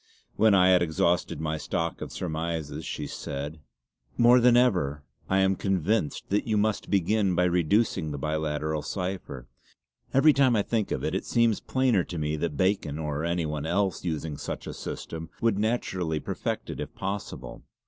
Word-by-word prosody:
When 110 -2 +5
I 90 -1 +5
had 90 -1 +5
exhausted 85 0 +1
my 80 0 -2
stock 85 +1 -2
of - - -5
surmises 80 -2 -3
she - - -4
said: 75 +3 -5 0.6
"More 120 +1 +7
than 120 0 +5
ever 90 - +2 0.3
I 95 0 +3
am 95 0 +3
convinced 95 -2 -1
that 105 +3 +1
you 110 -2 +1
must 105 0 0
begin 100 0 +2
by 90 - +3
reducing 90 0 +2
the 75 - -4
biliteral 75 +1 -2
cipher. 90 -10 -4 0.6
Every 150 +3 +6
time 130 -4 +4
I 105 - +2
think 110 -2 -1
of - - -2
it, - - -1
it - - -2
seems 115 -2 +3
plainer 130 -8 +2
to 90 - -6
me 75 0 -1
that 75 -2 -2
Bacon, 95 -6 +1
or 75 -1 -3
any 85 0 0
one 75 0 -3
else 95 +3 0
using 80 -3 -3
such - - -5
a - - -5
system, 80 0 -6
would 115 -4 +1
naturally 95 -8 -1
perfect - - -3
it - - -7
if - - -6
possible. 100 +1 -5
90 Hz, 175 wpm, -27 LUFS, 80-105 Hz, 0.6 s, More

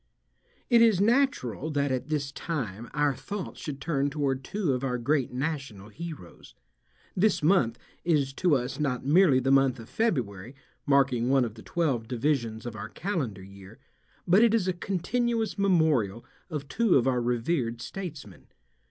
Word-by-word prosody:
It 235 -2 +5
is 225 -5 +5
natural 215 - +1
that 145 -2 0
at 130 +2 -2
this 145 -3 -1
time 120 - -4
our 145 -1 +1
thoughts 180 - -6
should 140 -3 -5
turn 140 -1 0
toward 140 -2 -1
two 185 -3 -1
of 125 +1 -3
our 125 -2 -1
great 135 +2 0
national 130 -7 -4
heroes. 155 - -10 0.6
This 190 -3 +2
month 140 -9 +3 0.3
is 145 -5 +1
to 175 0 +2
us 125 +2 -3
not 135 -4 -1
merely 150 -2 +5
the 135 +1 0
month 135 -2 +4
of 115 - -11
February, 125 - -2 0.3
marking 135 -4 +3
one 135 -2 +4
of 110 - -6
the 110 - -13
twelve 135 -9 -1
divisions 120 -3 -1
of 120 -2 -5
our 110 0 -6
calendar 135 - -3
year, 100 +3 -13 0.5
but 190 +6 +6
it 230 -1 +4
is 200 -5 +1
a 185 - +1
continuous 220 +5 -1
memorial 155 - +2 0.2
of 150 -4 -5
two 225 +4 +2
of 125 - +4
our 125 -2 +1
revered 120 0 -1
statesmen. 150 - -8
140 Hz, 160 wpm, -27 LUFS, 120-175 Hz, 0.6 s, but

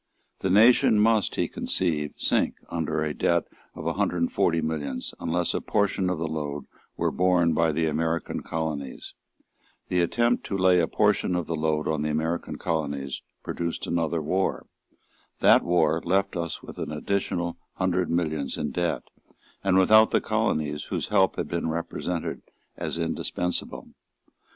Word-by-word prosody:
The 95 - -1
nation 110 +2 +6
must, 110 -1 +3
he - - 0
conceived, 75 -5 -2
sink - - +1
under 80 -2 -1
a 75 -1 -2
debt - - +2 0.3
of - - -8
a - - 0
hundred 90 - 0
and 85 0 0
forty 85 - +2
millions, 75 -5 -3
unless 85 +1 0
a - - -1
portion 95 -2 +1
of 90 - -1
the 80 - -2
load 75 -2 -4 0.3
were - - +1
borne 90 -2 +3
by 80 0 +2
the 80 +2 0
American 80 +1 -1
colonies. 75 -4 -4 0.8
The 90 -1 +2
attempt 120 +7 +1
to 100 - -2
lay 90 -1 +5
a 80 - +2
portion 105 -3 +2
of 90 -2 -1
the 85 - -2
load 75 -1 0
on 80 -1 0
the 75 - -1
American 80 +3 -2
colonies 70 -4 -3 0.2
produced 85 -1 -3
another 85 -1 -1
war. 95 +5 0 0.7
That - - +6
war 80 -2 +2
left 95 +1 +1
us 85 -2 -3
with - - -10
an - - -4
additional 85 +1 -2 0.2
hundred 90 -1 0
millions 80 -4 -1
of 75 - -3
debt, 85 -1 -1 0.6
and 95 -1 +3
without 110 +3 +6
the - - +3
colonies 75 -1 -1
whose - - -3
help 95 0 +3
had - - -3
been 85 -1 -2
represented 85 +1 -3 0.3
as - - -4
indispensable. 90 -1 -3
85 Hz, 160 wpm, -26 LUFS, 80-90 Hz, 0.8 s, nation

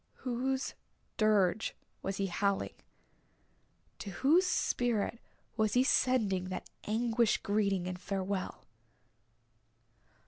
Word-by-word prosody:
Whose 260 +2 -1 0.4
dirge 215 -2 +2 0.3
was 195 0 -3
he 195 - 0
howling 195 +2 0 1.3
to 205 - -6
whose 300 - +3
spirit 235 - 0 0.4
was 215 -2 +2
he 250 - +5
sending 220 -9 +2
that 185 0 -6
anguished 230 +1 +1
greeting 200 -3 +1
and 180 0 -5
farewell? 195 -1 -3
210 Hz, 95 wpm, -32 LUFS, 195-240 Hz, 1.3 s, he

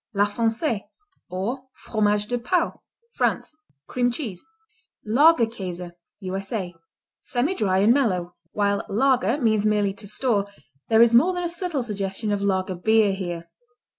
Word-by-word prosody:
La 200 +1 +4
Foncée, 225 +2 -1 0.5
or 230 +9 -4
Fromage 210 -1 0
de 245 +1 -1
Pau 335 +8 0 0.3
France - - -1 0.3
Cream 245 -1 +1
cheese. 230 - -6 0.6
Lager 260 +4 +5
Käse 180 -6 -6 0.3
U.S.A. 190 0 -4 0.5
Semidry 220 - 0
and 225 +3 +6
mellow. 185 -10 0 0.2
While 200 -1 0
lager 255 +1 +2
means 220 -5 +2
merely 210 -2 +2
"to 205 +1 -10
store," 210 -1 +1 0.4
there 225 0 +7
is 235 0 +3
more 320 +11 +5
than 355 0 -3
a 345 - -1
subtle 345 -6 -2
suggestion 205 -1 -3
of 205 -1 0
lager 190 -1 0
beer 210 +3 +3
here. 175 -3 -5
215 Hz, 135 wpm, -24 LUFS, 195-245 Hz, 0.6 s, there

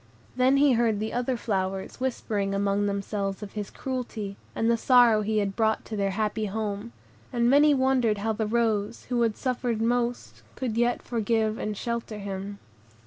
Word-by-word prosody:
Then 255 +2 +4
he 285 0 +5
heard 230 -3 +2
the 220 +1 -3
other 245 +1 0
flowers 190 -3 -2
whispering 210 -6 -1
among 200 +1 +1
themselves 200 0 -2
of 200 - -7
his 205 -2 -5
cruelty, 235 -6 -4 0.2
and 225 - 0
the 235 - +4
sorrow 235 -2 +5
he 215 +1 -1
had 200 -2 0
brought 220 -1 +1
to 220 - -5
their 200 -1 0
happy 215 +2 -1
home; 210 +2 -3 0.4
and 235 -2 +2
many 290 +3 +6
wondered 260 -5 +2
how 220 +2 -1
the 220 0 -2
rose, 220 -1 0
who 245 -1 +1
had 225 -2 +1
suffered 250 -3 -1
most, 240 +1 -1
could 245 -4 -3
yet 240 +1 +1
forgive 225 -1 0
and 210 -1 -3
shelter 235 -2 -3
him. 200 0 -5
220 Hz, 175 wpm, -27 LUFS, 205-240 Hz, 0.4 s, many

